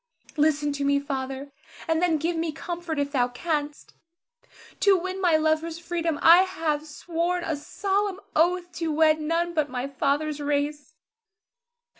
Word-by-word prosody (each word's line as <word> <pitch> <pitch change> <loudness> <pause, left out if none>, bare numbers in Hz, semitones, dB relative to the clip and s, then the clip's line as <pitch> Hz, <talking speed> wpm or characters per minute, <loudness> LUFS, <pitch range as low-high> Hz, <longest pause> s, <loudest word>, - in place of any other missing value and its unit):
Listen 295 -1 +2
to 285 0 -3
me, 280 0 +3
Father, 270 0 -5 0.4
and 325 0 +1
then 345 -3 +3
give 330 +3 -1
me 325 0 -1
comfort 340 0 -5
if 285 0 -1
thou 250 -4 +2
canst. 295 +3 -4 0.9
To 400 -2 +5
win 375 +2 -4
my 350 -4 +4
lover's 315 +1 0
freedom, 335 -2 -2
I 340 +2 +9
have 320 -5 -2
sworn 345 +3 -2
a 320 - -1
solemn 390 +6 -2 0.2
oath 350 +2 +2
to 330 -2 -1
wed 310 0 +3
none 335 +2 0
but 310 -3 +2
of - - -17
my 250 0 -3
father's 285 +2 -1
race. 290 +1 -2
315 Hz, 155 wpm, -25 LUFS, 290-345 Hz, 0.9 s, I